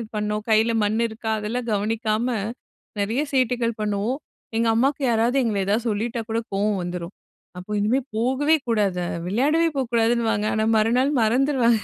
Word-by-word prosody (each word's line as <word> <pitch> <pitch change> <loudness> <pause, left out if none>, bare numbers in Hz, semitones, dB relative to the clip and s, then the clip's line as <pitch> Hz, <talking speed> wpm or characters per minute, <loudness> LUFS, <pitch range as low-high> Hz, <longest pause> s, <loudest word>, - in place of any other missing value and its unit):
பண்ணோம் 210 0 -2
கையில 220 +1 +3
மண் 215 +2 +1
இருக்கா? 220 0 -6
அதெல்லாம் 235 +3 -3
கவனிக்காம 220 +2 0 0.7
நெறைய 225 +7 0
சேட்டைகள் 245 -3 +1
பண்ணுவோம். 210 +5 -1 0.4
எங்க 230 0 +2
அம்மாக்கு 275 +5 +1
யாராவது 235 +3 +2
எங்கள 220 -4 0
ஏதாவது 215 +4 0
சொல்லிட்டா 230 +3 -2
கூட 225 +1 0
கோவம் 205 0 +1
வந்துரும். 175 +1 -5 0.4
அப்போ 180 +4 -8
இனிமே 220 +6 +2 0.2
போகவே 265 +7 +2
கூடாது. 200 -6 +1 0.2
விளையாடவே 295 - +2
போகக்கூடாதுன்னுவாங்க. 230 -3 +1
ஆனா 215 - +1
மறுநாள் 245 +6 +2
மறந்துருவாக 240 0 +3
225 Hz, 135 wpm, -23 LUFS, 210-245 Hz, 0.7 s, கையில